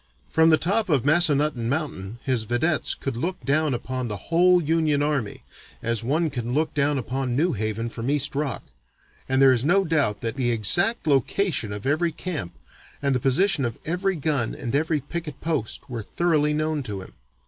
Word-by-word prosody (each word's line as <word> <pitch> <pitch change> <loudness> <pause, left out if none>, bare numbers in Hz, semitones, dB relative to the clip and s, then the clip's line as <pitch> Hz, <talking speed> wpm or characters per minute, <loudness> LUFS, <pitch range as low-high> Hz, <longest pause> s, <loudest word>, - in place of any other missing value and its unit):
From 160 0 +4
the 160 - +5
top 200 +5 0
of 135 -6 +2
Massanutton 150 -6 +3
Mountain 120 -8 -3
his 125 -5 0
vedettes 145 +8 0
could 135 -3 -4
look 175 +10 -3
down 145 -1 +1
upon 130 +1 -4
the 105 -2 -4
whole 180 +2 +5
Union 155 -2 +1
army, 140 -8 -2 0.4
as 115 0 -1
one 155 +6 0
can 120 -1 -3
look 155 +1 0
down 145 0 +1
upon 130 0 -2
New 170 +6 +2
Haven 110 +2 -2
from 115 +2 -5
East 145 0 0
Rock, 140 -2 -2 0.7
and 130 0 +2
there 135 -1 +7
is 120 -1 +1
no 190 +6 +3
doubt 145 - +1
that 115 +3 -3
the 125 -2 +1
exact 175 - +3
location 145 - +1
of 105 0 -6
every 155 +5 +1
camp, 155 - -6 0.4
and 140 -1 0
the 130 - +1
position 140 +6 +2
of 115 -2 -3
every 185 +4 0
gun 145 -6 -1
and 120 -3 -5
every 155 0 +1
picket 155 -2 -6
post 155 -9 -2
were 120 -4 -5
thoroughly 150 - +1
known 155 0 -1
to 100 -7 -6
him. - - -14
145 Hz, 185 wpm, -24 LUFS, 120-160 Hz, 0.7 s, there